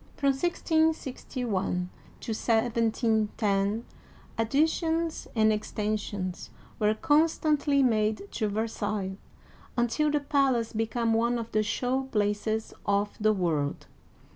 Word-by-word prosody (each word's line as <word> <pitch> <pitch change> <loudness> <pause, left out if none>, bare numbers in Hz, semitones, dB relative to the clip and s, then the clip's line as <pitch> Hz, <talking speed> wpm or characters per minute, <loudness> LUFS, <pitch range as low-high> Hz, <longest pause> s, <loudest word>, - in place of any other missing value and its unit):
From 280 - +1
1 270 - -5
66 320 -5 0
1 195 -7 -1 0.3
to 225 - -3
17 225 -1 +1
10 205 +1 +1 0.5
additions 320 +7 0
and 220 -1 +4
extensions 210 -3 -3 0.3
were 215 0 +3
con 305 +4 +4
stantly 295 -3 +1
made 215 - +1
to 215 - -1
Versailles, 205 -2 -2 0.6
until 240 +6 +2
the 295 0 +2
palace 275 -5 +1
became 225 +1 0
one 235 +2 +2
of 230 -1 -5
the 215 - +2
show 250 +5 -1
places 215 -1 -1
of 205 +1 +1
the 215 0 +4
world. 165 -8 -1
225 Hz, 115 wpm, -28 LUFS, 210-270 Hz, 0.6 s, and